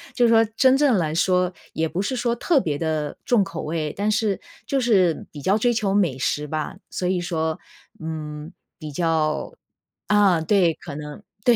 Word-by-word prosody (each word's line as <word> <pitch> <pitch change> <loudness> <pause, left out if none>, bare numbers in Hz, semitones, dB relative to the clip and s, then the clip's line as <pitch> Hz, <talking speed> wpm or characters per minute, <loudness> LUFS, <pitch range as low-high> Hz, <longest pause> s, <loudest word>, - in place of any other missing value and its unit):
就 240 -2 +4
说 225 0 +5
真 260 +2 +5
正 280 -5 +4
来 155 -4 0
说 180 0 +2 0.2
也 160 0 0
不 180 - -2
是 210 +6 -2
说 240 -1 0
特 290 +4 +2
别 150 -7 -2
的 155 -2 -2
重 230 -5 +3
口 170 - -6
味， 155 -1 -2
但 205 +2 0
是 215 -2 0 0.3
就 275 - +1
是 195 -9 +2
比 145 - -9
较 195 +8 +2
追 240 +2 +2
求 210 -4 0
美 175 -10 +2
食 150 +3 -1
吧， 155 +4 -4
所 180 - -2
以 185 0 +1
说， 160 -2 -2 0.4
嗯， 155 -1 -6 0.3
比 155 -3 -7
较 160 0 0 0.5
啊， 200 -5 +4
对， 175 0 +3
可 150 -2 -9
能 150 +5 -8 0.2
对， 240 - +6
180 Hz, 195 characters per minute, -23 LUFS, 155-215 Hz, 0.5 s, 对